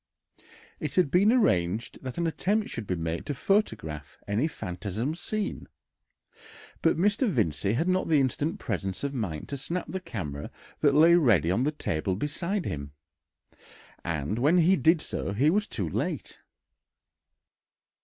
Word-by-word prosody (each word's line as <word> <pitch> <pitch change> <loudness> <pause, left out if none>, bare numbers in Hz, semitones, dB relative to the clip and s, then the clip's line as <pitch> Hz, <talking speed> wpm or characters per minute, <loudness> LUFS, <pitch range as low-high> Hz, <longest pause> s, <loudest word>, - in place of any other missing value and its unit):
It 150 -2 -4
had 180 -7 +3
been 200 +5 +5
arranged 105 - +1
that 130 -2 -6
an 170 - 0
attempt 205 +6 0
should 115 -4 -5
be 90 - 0
made 80 0 -3
to 145 - -2
photograph 80 - -1
any 110 +9 +1
phantasm 105 - -4
seen, 205 +4 -4 1.1
but 165 - +3
Mr. 205 +7 +2
Vincey 100 - 0
had 160 +9 0
not 185 0 +1
the 155 -3 +4
instant 145 +4 0
presence 95 -3 -3
of 140 0 -2
mind 95 - -3
to 140 - -3
snap 170 +6 -4
the 190 - -3
camera 80 - -5 0.3
that 145 -2 +3
lay 165 +3 +7
ready 110 - +4
on 120 +8 +1
the 150 - +2
table 95 - -2
beside 170 - -2
him, 70 -1 -5 1.1
and 85 +6 -2
when 150 +8 +4
he 180 +2 +5
did 165 -2 +3
so 100 - -3
he 140 +9 +3
was 210 +3 +1
too - - -2
late. - - -3
140 Hz, 155 wpm, -28 LUFS, -, 1.1 s, lay